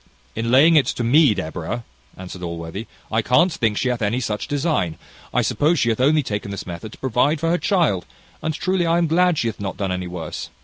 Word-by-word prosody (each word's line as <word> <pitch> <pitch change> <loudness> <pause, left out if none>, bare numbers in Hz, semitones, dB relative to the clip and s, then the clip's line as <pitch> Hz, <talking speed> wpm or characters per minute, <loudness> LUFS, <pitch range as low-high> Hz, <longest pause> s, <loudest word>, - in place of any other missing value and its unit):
"In 115 +1 -2
laying 145 +7 +6
it 145 - +4
to 120 - -2
me, 130 -1 +5
Deborah!" 85 +8 -4 0.3
answered 90 0 -8
Allworthy: 85 +4 -5 0.2
"I 110 +1 +2
can't 155 +10 +3
think 110 -2 0
she 130 - 0
hath 125 -1 -2
any 110 +4 0
such 105 -4 -3
design. 145 - -1 0.3
I - - +1
suppose 160 +4 +2
she 120 - +2
hath 115 +2 0
only 150 +3 +4
taken 105 -3 -4
this 100 -1 -6
method 90 +4 -7
to - - -12
provide 130 +4 +1
for 165 +2 0
her 175 - +1
child; 165 - +1 0.3
and 160 - -1
truly 180 +2 0
I 165 +1 +3
am 170 - +2
glad 175 +1 +3
she 115 - 0
hath 115 - -4
not 100 -2 -4
done 95 -2 -1 0.2
worse." 85 -2 -6
120 Hz, 220 wpm, -21 LUFS, 100-155 Hz, 0.3 s, laying